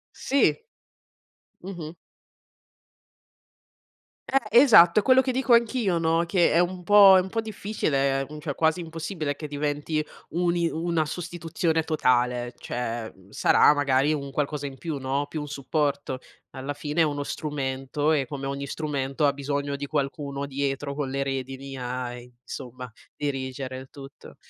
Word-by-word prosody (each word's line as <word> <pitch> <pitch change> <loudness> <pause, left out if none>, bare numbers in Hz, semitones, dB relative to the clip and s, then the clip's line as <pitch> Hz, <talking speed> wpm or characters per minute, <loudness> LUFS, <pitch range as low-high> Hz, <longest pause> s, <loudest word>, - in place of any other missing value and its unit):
Sì. 280 +1 +2 1.1
Mh-mh. 175 -3 -7 2.3
Eh! 235 -3 +4
Esatto, 195 -10 +7
è - - -7
quello 260 +3 +5
che 260 - -1
dico 255 -1 +3
anch'io, 235 -5 +2
no, 165 0 +2
che 175 -1 +3
è 165 - +4
un 180 +1 0
po' 200 0 +8
è - - +6
un 190 - -8
po' 225 - 0
difficile, 155 -11 -1
ehm, 150 +1 -9
cioè 145 -4 -4
quasi 160 +2 +1
impossibile 160 -2 -4
che 150 +1 -7
diventi 150 +1 -2 0.3
un 175 +1 +1
i 170 -1 +1
una 165 -1 -1
sostituzione 165 -1 -2
totale, 125 -5 +1
cioè, 120 -1 -4
ehm, 95 -2 -15
sarà 125 - +5
magari 140 0 +2
un 140 -2 -3
qualcosa 145 +1 -2
in 135 -1 -8
più, 155 0 -4
no, 135 +2 -1
più 155 +1 -4
un 150 - -6
supporto. 140 -1 -2 0.3
Alla 135 +2 -5
fine 150 +3 -2
è 160 - +6
uno 145 -1 -2
strumento 140 0 -2
e 140 -4 +1
come 135 +1 -6
ogni 140 0 -3
strumento 140 -1 -2
ha 140 - +3
bisogno 140 0 -3
di 145 0 -5
qualcuno 140 -1 -3
dietro 140 0 -3
con 145 -1 -3
le 140 +1 -2
redini 135 0 -4
a, 125 0 -4
insomma, 125 +1 -9 0.3
dirigere 130 -2 -4
il 130 0 -10
tutto. 140 -2 -13
145 Hz, 155 wpm, -26 LUFS, 135-165 Hz, 2.3 s, po